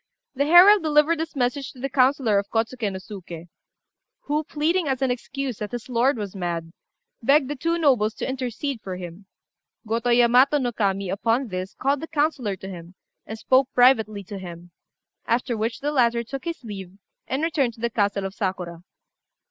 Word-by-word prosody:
The 280 Hz, +1 st, 0 dB
herald 365 Hz, +5 st, +8 dB
delivered 310 Hz, +1 st, +3 dB
this 320 Hz, -1 st, -4 dB
message 255 Hz, +1 st, -1 dB
to 255 Hz, -, -15 dB
the 270 Hz, -, -2 dB
councillor 255 Hz, -5 st, +3 dB
of 200 Hz, -, -6 dB
Kôtsuké 225 Hz, -1 st, -1 dB
no 190 Hz, -, -5 dB
Suké, 175 Hz, -3 st, -10 dB, 0.7 s
who, 300 Hz, -6 st, -1 dB
pleading 315 Hz, +3 st, 0 dB
as 265 Hz, -1 st, -1 dB
an 260 Hz, -, +2 dB
excuse 250 Hz, +2 st, -4 dB
that 210 Hz, +1 st, -5 dB
his 240 Hz, +1 st, -6 dB
lord 250 Hz, +2 st, +2 dB
was 205 Hz, -2 st, -5 dB
mad, 170 Hz, -3 st, -3 dB, 0.5 s
begged 275 Hz, +3 st, +4 dB
the -, -, -2 dB
two 335 Hz, +5 st, -1 dB
nobles 250 Hz, -9 st, +2 dB
to -, -, -4 dB
intercede 260 Hz, 0 st, -3 dB
for 190 Hz, -2 st, -6 dB
him. 180 Hz, +2 st, -9 dB, 0.6 s
Gotô 230 Hz, +2 st, 0 dB
Yamato 250 Hz, +4 st, +5 dB
no 250 Hz, -4 st, -1 dB
Kami 195 Hz, -4 st, -1 dB
upon 230 Hz, +5 st, 0 dB
this 185 Hz, 0 st, -5 dB
called 275 Hz, +1 st, 0 dB
the 325 Hz, -, -6 dB
councillor 290 Hz, -10 st, 0 dB
to 190 Hz, -, -10 dB
him, 175 Hz, -1 st, -10 dB, 0.3 s
and 220 Hz, -, -6 dB
spoke 260 Hz, +3 st, +2 dB
privately 220 Hz, -5 st, +4 dB
to 195 Hz, +1 st, -8 dB
him, 175 Hz, -1 st, -10 dB, 0.6 s
after 240 Hz, 0 st, 0 dB
which 225 Hz, +2 st, -3 dB
the 290 Hz, +1 st, -1 dB
latter 235 Hz, -4 st, +2 dB
took 270 Hz, +3 st, -7 dB
his 335 Hz, -5 st, -5 dB
leave 195 Hz, -4 st, -8 dB, 0.3 s
and 270 Hz, +4 st, -2 dB
returned 280 Hz, -8 st, 0 dB
to -, -, -19 dB
the 235 Hz, +1 st, -1 dB
castle 200 Hz, -2 st, 0 dB
of 190 Hz, -, -5 dB
Sakura. 180 Hz, -4 st, -4 dB
240 Hz, 185 wpm, -24 LUFS, 200-275 Hz, 0.7 s, herald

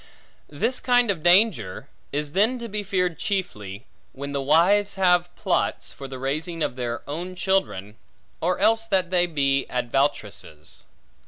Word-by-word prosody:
This 225 Hz, -, -1 dB
kind 245 Hz, -3 st, +3 dB
of 175 Hz, -5 st, -4 dB
danger, 175 Hz, -, +3 dB, 0.2 s
is 145 Hz, 0 st, -2 dB
then 215 Hz, -, +2 dB
to 235 Hz, -1 st, -6 dB
be 210 Hz, -1 st, -3 dB
feared 180 Hz, -5 st, -1 dB
chiefly, 110 Hz, -, -3 dB, 0.3 s
when 140 Hz, +1 st, -6 dB
the 140 Hz, -1 st, -1 dB
wives 185 Hz, +9 st, +3 dB
have 180 Hz, -2 st, +3 dB
plots, 190 Hz, -4 st, -1 dB
for 140 Hz, -, -8 dB
the 130 Hz, -1 st, -7 dB
raising 155 Hz, +5 st, -2 dB
of -, -, -2 dB
their 120 Hz, -1 st, -4 dB
own 175 Hz, +5 st, -5 dB
children; 180 Hz, -, -1 dB, 0.4 s
or 180 Hz, +2 st, +1 dB
else 225 Hz, +2 st, +3 dB
that 190 Hz, -4 st, +1 dB
they 180 Hz, -1 st, +3 dB
be 140 Hz, -4 st, +1 dB
advoutresses. 120 Hz, -, -2 dB
170 Hz, 150 wpm, -24 LUFS, 135-195 Hz, 0.4 s, kind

